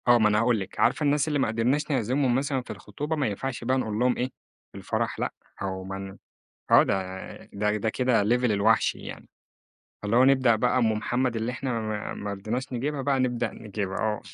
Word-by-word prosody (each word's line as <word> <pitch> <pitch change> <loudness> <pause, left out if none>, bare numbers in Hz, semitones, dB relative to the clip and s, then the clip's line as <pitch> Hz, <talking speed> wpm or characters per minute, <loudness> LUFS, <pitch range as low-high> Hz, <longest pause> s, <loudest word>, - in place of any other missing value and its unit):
آه 120 0 +7
ما 110 -2 +4
أنا 105 0 +3
هاقول 115 -1 +2
لِك، 95 0 -7
عارفة - - +3
الناس 145 0 +2
اللي 150 -2 0
ما 130 - +2
قدرناش 125 +8 0
نعزمهم 130 0 +1
مثلًا 135 0 0
في - - -18
الخطوبة 150 +2 -4
ما 145 -5 0
ينفعش 120 +4 -4
بقى 130 +2 +1
نقول 110 -4 -2
لهم 125 0 +2
إيه 125 - 0 0.5
في - - -11
الفرح - - -2
لأ، - - -2 0.3
أو 95 -1 -3
ما 95 +1 -5
ن 95 0 -8 0.5
آه - - +8
ده 95 -1 -3 0.2
ده 105 +1 0
ده 105 +1 -1
كده 125 -2 +2
level 120 +4 +2
الوحْش 105 +2 +3
يعني، - - -9 0.7
فاللي 105 +2 0
هو 125 - +7
نبدأ 130 -4 +4
بقى 125 +3 +2
أم 115 -3 +3
محمد 120 +3 -1
اللي 115 +2 -2
إحنا 125 -2 -2
ما 110 -1 -4
ما 105 0 -5
رديناش 115 +7 -4
نجيبها 135 +3 -2
بقى 135 0 +1
نبدأ 120 -2 0
نجيبها 100 -2 -4
آه، 105 -1 -1
120 Hz, 210 wpm, -26 LUFS, 105-130 Hz, 0.7 s, آه